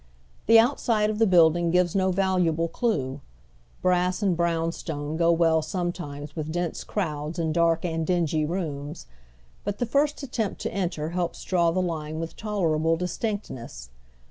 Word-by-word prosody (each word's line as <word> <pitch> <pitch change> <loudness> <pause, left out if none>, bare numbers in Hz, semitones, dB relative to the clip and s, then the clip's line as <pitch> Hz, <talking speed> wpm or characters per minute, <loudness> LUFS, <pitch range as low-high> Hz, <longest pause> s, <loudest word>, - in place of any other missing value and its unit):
The 225 +1 +8
outside 225 -3 +3
of 215 - -4
the 225 - +5
building 170 -1 +5
gives 180 0 +2
no 190 -1 +2
valuable 180 -3 +1
clew. 145 - -1 0.6
Brass 180 +2 +2
and 190 -3 +2
brown 165 -1 0
stone 150 -2 -5
go 170 +1 +3
well 165 -1 +3
sometimes 155 -4 -4
with 155 -1 -4
dense 175 0 -2
crowds 155 -5 -3
and 160 -2 0
dark 170 0 +2
and 165 -1 -1
dingy 160 -2 +1
rooms; 150 - -4 0.6
but 205 0 -3
the 245 - 0
first 285 +4 +1
attempt 230 -6 -2
to - - -3
enter 170 -5 -2
helps 175 0 -3
draw 175 -2 +2
the 185 +2 0
line 155 -2 -3
with 165 0 -5
tolerable 165 -6 0
distinctness. 170 - -4
170 Hz, 155 wpm, -26 LUFS, 160-190 Hz, 0.6 s, The